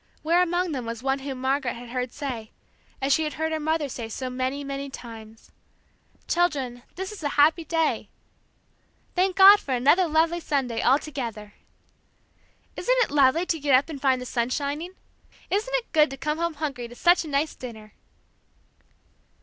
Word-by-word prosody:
Where 335 +3 +3
among 355 0 0
them 255 -5 -4
was 230 +1 -5
one 270 0 0
whom 270 -1 -6
Margaret 265 -1 0
had 240 0 -10
heard 250 0 -3
say 250 -7 -5 0.5
as 275 +1 +3
she 320 - +2
had 305 - -3
heard 320 +1 -2
her 315 - -1
mother 310 -1 0
say 235 -4 -6
so 255 +3 -5
many, 260 +3 -2
many 275 0 -5
times, 225 -4 -11 0.8
"Children, 275 -9 0
this 380 +2 -5
is 425 - -9
a 290 - -1
happy 315 +3 +5
day," 325 -1 -1 1.0
"Thank 370 0 +1
God 400 +1 +9
for 265 - -2
another 290 +9 +4
lovely 325 +2 +2
Sunday 270 -8 -1
all 265 +3 +5
together," 230 -9 -6 1.2
"Isn't - - +1
it - - -4
lovely 290 +4 +4
to 330 -2 -1
get 280 -2 +3
up 275 +5 +2
and 285 -4 -7
find 265 -2 +3
the 250 - -6
sun 240 -1 -1
shining?" 295 +7 -3 0.6
"Isn't 440 +6 0
it - - -2
good 305 -2 +4
to 270 - -7
come 300 +4 -2
home 340 -1 -1
hungry 280 -5 -4
to 240 - -13
such 345 +6 +4
a - - -8
nice 295 +2 0
dinner!" 220 -4 -10
280 Hz, 180 wpm, -25 LUFS, 255-325 Hz, 1.2 s, God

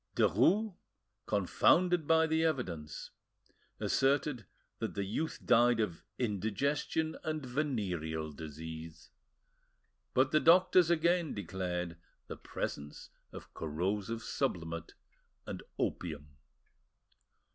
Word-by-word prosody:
Derues, 190 - +3 0.5
confounded 160 - +3
by 160 0 +5
the 160 0 +1
evidence, 90 - -2 0.7
asserted 135 -3 +1 0.3
that - - -3
the 100 - -1
youth 130 +12 -2
died 120 0 +5
of 95 -7 -2
indigestion 130 - -1
and 155 -3 -3
venereal 95 - -2
disease. 80 +2 -8 1.0
But 130 +1 +4
the 155 - +5
doctors 180 +1 +6
again 170 0 +2
declared 90 -3 -3 0.3
the - - -7
presence 75 0 -6 0.2
of - - -11
corrosive 95 +8 -2
sublimate 85 -1 -3 0.5
and - - -5 0.2
opium. 75 -4 -3
110 Hz, 90 wpm, -33 LUFS, -, 1.0 s, doctors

